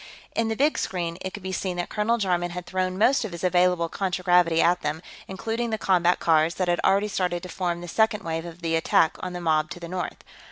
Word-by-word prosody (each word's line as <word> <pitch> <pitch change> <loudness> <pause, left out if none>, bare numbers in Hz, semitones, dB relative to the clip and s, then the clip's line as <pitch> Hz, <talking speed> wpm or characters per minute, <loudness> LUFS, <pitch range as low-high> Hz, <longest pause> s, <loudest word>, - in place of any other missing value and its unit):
In 230 0 +1
the 225 - -1
big 290 +6 +2
screen, 170 -2 -3
it 190 - -4
could 205 - -9
be 190 - -4
seen 185 -1 -3
that 175 - -3
Colonel 220 +2 +1
Jarman 180 -4 0
had 175 0 -6
thrown 185 +1 -2
most 250 +7 +3
of 210 -5 -5
his 170 - -7
available 180 -1 +3
contragravity 180 -2 +2
at 175 +1 +3
them, 150 +3 -3 0.2
including 225 +5 -3
the 220 - -1
combat 180 -3 +2
cars, 160 0 +3
that 185 - -1
had 175 0 +1
already 200 +2 +3
started 180 -4 -2
to 180 - -7
form 175 -2 -2
the 175 - -7
second 220 +3 +1
wave 165 0 -3
of 170 +1 -11
the 165 0 0
attack 160 0 +3
on 185 -1 -5
the 180 - -4
mob 155 -2 +1
to - - -8
the 170 - -7
north. 180 +1 -5
180 Hz, 240 wpm, -25 LUFS, 170-190 Hz, 0.2 s, most